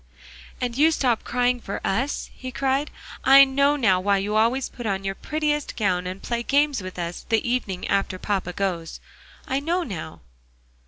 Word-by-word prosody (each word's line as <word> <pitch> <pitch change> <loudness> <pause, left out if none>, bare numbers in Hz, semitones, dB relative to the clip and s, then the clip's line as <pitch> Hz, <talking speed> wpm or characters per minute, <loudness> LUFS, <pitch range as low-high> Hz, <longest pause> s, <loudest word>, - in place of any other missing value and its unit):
"And 245 -2 -2
you 310 +2 +6
stop 255 -7 +1
crying 245 0 +1
for 200 - -5
us," 255 +9 -1
he 255 0 -7
cried; 270 +3 0 0.3
"I 275 +1 +9
know 280 +2 +3
now 200 -10 +3
why 200 +2 +2
you 205 +2 -2
always 235 +5 +2
put 240 -2 -7
on 195 -1 -1
your 195 0 -2
prettiest 300 +4 -2
gown, 180 -5 0
and 185 +2 -6
play 235 -1 -2
games 285 0 +2
with 185 0 -8
us 170 0 -4
the 225 +1 +1
evening 215 -7 -2
after 195 -1 0
papa 190 -2 -2
goes. 175 -5 -3 0.5
I 265 - 0
know 340 +5 0
now." 170 - -7
235 Hz, 175 wpm, -24 LUFS, 195-270 Hz, 0.5 s, I